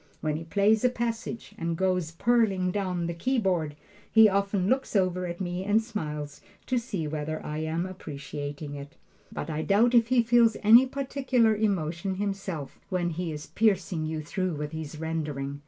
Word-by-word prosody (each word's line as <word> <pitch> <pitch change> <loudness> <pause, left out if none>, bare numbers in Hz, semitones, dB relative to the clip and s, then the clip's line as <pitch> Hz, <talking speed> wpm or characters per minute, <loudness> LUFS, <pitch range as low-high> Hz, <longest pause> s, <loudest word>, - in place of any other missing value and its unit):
When 155 -1 -1
he 165 +2 -5
plays 205 +5 +3
a 250 - +5
passage 235 -1 -4
and 165 0 -2
goes 185 -3 +1
pearling 195 0 +2
down 185 -3 -1
the 170 - -2
keyboard, 180 - 0 0.4
he 220 -1 +8
often 200 -1 +1
looks 260 0 0
over 185 -2 +1
at 175 0 -6
me 180 -1 -3
and 205 +3 +3
smiles, 150 -10 -5 0.2
to 255 -2 +1
see 200 -9 -4
whether 155 +1 -3
I 150 +1 -3
am 160 +2 -1
appreciating 145 -4 -6
it. 145 +2 -9 0.4
But - - -5
I 155 0 -2
doubt 215 +8 +3
if 230 -2 +5
he 245 -1 +4
feels 235 -1 +4
any 235 +5 +8
particular 260 -4 +1
emotion 190 -3 -1
himself 195 -6 -4
when 175 -2 0
he 170 0 -3
is 150 -1 -6
piercing 185 -7 +1
you 155 -1 -3
through 185 +2 -2
with 150 0 -4
his 160 -1 -6
rendering. 150 -4 -3
185 Hz, 170 wpm, -27 LUFS, 155-220 Hz, 0.4 s, he